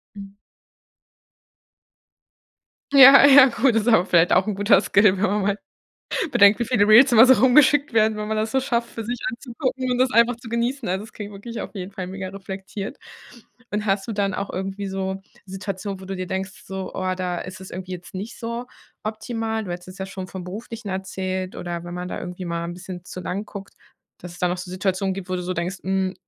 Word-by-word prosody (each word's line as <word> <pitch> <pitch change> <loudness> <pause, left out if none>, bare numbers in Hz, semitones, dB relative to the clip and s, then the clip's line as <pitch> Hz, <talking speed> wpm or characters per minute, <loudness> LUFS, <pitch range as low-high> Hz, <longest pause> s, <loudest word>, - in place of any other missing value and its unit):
Mhm. 200 0 -10 2.6
Ja, 275 0 +9
ja, 270 -2 +8
cool, 265 0 +5
das 225 -1 +1
ist - - -6
aber 220 -6 +5
vielleicht 175 -1 +3
auch 190 - +3
'n 210 - -1
guter 205 0 +4
Skill, 200 +1 +4
wenn 190 - -2
man 210 0 +1
mal 200 +1 0 0.7
bedenkt, 200 0 +6
wie 235 - 0
viele 215 -4 +2
Reels 240 +5 +7
immer 230 0 +9
so 260 0 +7
rumgeschickt 265 +4 +4
werden, 220 -1 +3
wenn 210 0 -4
man 220 0 -2
das 215 +1 -1
so 265 - +1
schafft, 240 -3 -1
für 225 - -6
sich 240 +2 -3
anzugucken 255 +1 -3
und 245 - -1
das 255 0 +3
einfach 235 0 +4
zu 235 0 -12
genießen. 235 +2 -2
Also, 190 +3 -2
es 220 - -14
klingt 205 -1 -8
wirklich 230 +4 -7
auf - - -7
jeden 190 +1 -6
Fall 185 -2 -6
mega 190 0 -6
reflektiert. 195 +1 -7 0.7
Und 210 +1 -2
hast 195 +1 0
du - - -2
dann 200 -2 -1
auch 200 +1 -4
irgendwie 195 +1 -4
so 190 0 -3 0.3
Situationen, 195 0 -5
wo - - -10
du 195 +1 -5
dir 185 0 -4
denkst 190 +1 -3 0.2
so, 190 -1 -6
oh, 185 0 -1
da 180 -1 -3
ist 185 +1 -8
es 190 - -10
irgendwie 185 +1 -7
jetzt 180 0 -9
nicht 200 +5 -7
so 235 +1 -4 0.4
optimal? 220 +1 -3
Du 185 - -7
hättest 175 +1 -7
es 185 - -11
ja 190 - -4
schon 190 -1 -7
von 185 0 -8
Beruflichen 220 +4 -8
erzählt 190 -1 -4
oder 175 -1 -5
wenn 175 0 -7
man 180 0 -5
da - - -5
irgendwie 180 +1 -7
mal 170 -1 -3
'n 170 +1 -5
bisschen 180 0 -9
zu 185 - -8
lang 185 +3 -4
guckt, 200 -1 -10 0.4
dass 180 - -10
es 175 - -13
da 180 - +2
noch 180 +1 -2
so 180 - -7
Situationen 190 +1 -1
gibt, 190 -1 -7
wo 185 - -1
du 180 - -4
so 180 +1 -3
denkst: 180 +2 -3
„Hm, 190 0 -1
195 Hz, 225 wpm, -23 LUFS, 185-225 Hz, 2.6 s, Ja